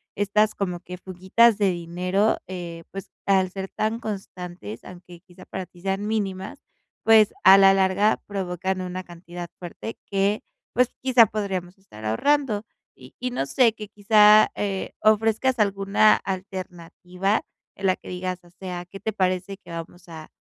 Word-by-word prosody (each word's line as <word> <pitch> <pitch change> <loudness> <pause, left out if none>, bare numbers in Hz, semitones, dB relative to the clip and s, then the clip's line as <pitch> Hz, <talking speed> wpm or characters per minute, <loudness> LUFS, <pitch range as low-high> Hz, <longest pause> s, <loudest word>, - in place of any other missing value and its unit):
estas, 210 +1 +2
como 180 -3 -3
que 180 0 -9
fuguitas 190 +5 +2
de 200 -3 +2
dinero, 180 +4 0
eh, 170 -2 -7
pues 195 -1 -8 0.2
al 190 -2 +3
ser 195 0 -6
tan 220 +2 -2
constantes, 180 - -7
aunque 175 -1 -13
quizá 180 0 -16
para 190 - -6
ti 175 - -19
sean 195 +2 -2
mínimas, 195 -4 -3 0.4
pues, 220 -2 +6
a 190 +1 +9
la 195 0 +7
larga, 195 +2 +2
provocan 185 -1 -3
una 185 0 -5
cantidad 175 0 -9
fuerte, 180 +5 -7
que, 200 +2 +1 0.3
pues 250 0 +3
quizá, 250 -4 +6
podríamos 190 -3 -4
estar 180 - -14
ahorrando". 230 - +1 0.3
Y - - -15
y, 250 - -2
no 245 - -1
sé, 225 - +3
que 215 -2 -9
quizá, 210 0 +6
eh, 195 -2 -3
ofrezcas 225 +4 +2
alguna 200 +1 +4
alternativa, 185 +1 -3 0.3
en 195 - -6
la 185 - +3
que - - -12
digas: 180 0 -4
"O 175 - -19
sea, 180 -1 -7
qué 195 +2 -11
te 220 +3 -3
parece 185 0 -1
que - - -19
vamos 170 +1 -9
a 160 -1 -10
190 Hz, 160 wpm, -24 LUFS, 180-210 Hz, 0.4 s, a